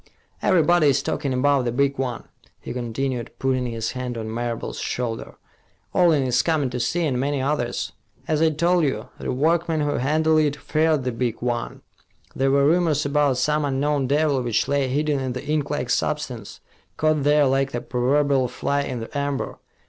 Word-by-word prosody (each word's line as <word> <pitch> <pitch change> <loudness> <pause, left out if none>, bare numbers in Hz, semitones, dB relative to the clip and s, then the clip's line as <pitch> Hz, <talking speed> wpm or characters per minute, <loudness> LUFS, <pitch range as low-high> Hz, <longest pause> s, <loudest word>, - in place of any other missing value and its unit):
"Everybody 175 -3 +4
is 140 - +2
talking 140 - -2
about 135 +1 +2
the 120 - -1
big 140 +2 0
one," 125 -3 -2 0.4
he - - -7
continued, 125 0 -3
putting 130 -1 0
his 115 -2 -3
hand 125 -2 -4
on 110 -1 -5
Marable's 120 0 -3
shoulder. 120 -2 -3 0.6
"Orling 165 -6 +4
is 125 -1 +2
coming 150 -6 0
to 125 - -3
see, 170 +8 0
and 130 -5 0
many 140 +1 0
others. 120 - -1 0.4
As 155 -1 +1
I 160 - +5
told 170 +3 +2
you, 140 - -2
the - - -3
workmen 160 +3 +1
who 145 0 0
handled 155 +4 +2
it 150 -2 +1
feared 155 -1 +1
the 125 - -1
big 120 -1 -2
one. 120 -1 -3 0.5
There 135 +1 +1
were 140 0 +3
rumors 160 -2 +2
about 140 -2 +2
some 150 +4 +1
unknown 140 0 0
devil 145 -1 +2
which 120 -3 0
lay 140 -1 +1
hidden 145 +2 0
in 130 -1 -2
the 125 +2 -6
inklike 145 -4 -1
substance, 125 -8 -2 0.4
caught 155 -1 +2
there 145 +1 +4
like 135 0 +1
the 120 - -2
proverbial 135 +2 +1
fly 140 +3 -1
in 125 -4 -4
the 115 - -9
amber. 140 -1 -2
140 Hz, 180 wpm, -23 LUFS, 125-150 Hz, 0.6 s, I